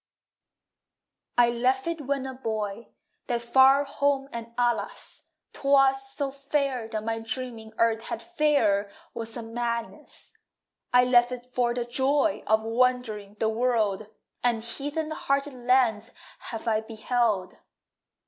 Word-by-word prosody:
I 240 -1 +5
left 255 +2 +1
it 330 -5 -4
when 275 -1 -1
a 265 - -5
boy, 220 -3 -4 0.4
That 240 -2 -1
far 265 +3 +6
home 280 -1 0
and, 230 0 -6
alas, 240 -1 -2 0.2
'Twas 270 -1 +3
so 280 -2 -2
fair 275 -3 -1
that 215 -1 -4
my 225 0 -2
dreaming 225 -1 -5
Earth 225 -1 +2
had 345 - -4
fairer 280 - +2 0.2
was 230 0 -4
a 235 - -5
madness. 235 0 -5 0.6
I 250 0 +6
left 245 -1 +4
it 250 -1 -6
for 245 -1 0
the 240 -1 -2
joy 275 +5 +2
Of 220 0 +3
wandering 225 -3 0
the 220 +1 0
world, 220 -3 0 0.4
And 235 -2 +1
heathen 290 +6 -4
hearted 275 -1 -1
lands 245 -3 +2 0.4
have 225 -1 -6
I 220 -1 +2
beheld! 220 -3 -1
245 Hz, 130 wpm, -27 LUFS, 225-270 Hz, 0.6 s, far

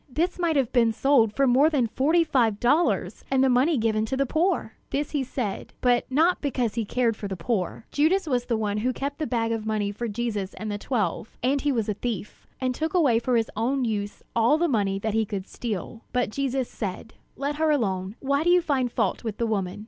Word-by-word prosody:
This 340 +8 -1
might 335 -3 +1
have 265 -5 +1
been 235 -3 +4
sold 235 -2 +3
for 275 +5 +2
more 265 +4 +5
than 280 -6 +2
forty 300 +9 +2
five 235 -9 +1
dollars, 295 +8 +1
and 265 -1 +3
the 265 - +4
money 265 +5 +3
given 220 -1 +1
to 265 - -2
the 275 - +2
poor!" 320 - 0 0.2
This 290 +1 -2
he 290 -3 0
said, 240 -5 -4
but 245 -1 +2
not 325 +7 +3
because 250 -6 -1
he 230 -2 -2
cared 235 +1 +1
for 205 - -6
the 190 -1 -5
poor. 190 +2 -2
Judas 335 +6 +2
was 250 -5 0
the 235 -3 0
one 210 -1 -1
who 250 +4 0
kept 280 +3 -4
the 310 - -1
bag 230 -2 0
of 225 -1 -2
money 210 -2 0
for 235 +4 -4
Jesus 210 -3 -3
and 215 -1 -5
the 205 - -3
twelve; 225 -2 -2
and 270 +2 +2
he 290 - +1
was 230 -5 0
a 210 - 0
thief, 215 -1 -5
and 255 -1 0
took 315 +7 -3
away 275 -10 +4
for 240 +1 +1
his 225 - 0
own 250 +4 0
use 205 -2 -3
all 235 +6 +4
the 345 +2 +2
money 200 -8 +1
that 215 +2 -2
he 225 0 +2
could 200 -3 -5
steal. 225 0 -5
But 250 -4 0
Jesus 270 0 -1
said: 205 +1 -6 0.2
"Let 285 +2 -3
her 315 0 +2
alone; 195 -8 0
why 280 +2 +1
do 345 - +2
you 360 0 +6
find 265 -6 0
fault - - -1
with 220 -3 -4
the 235 - 0
woman? 200 -4 -2
245 Hz, 230 wpm, -25 LUFS, 220-280 Hz, 0.2 s, you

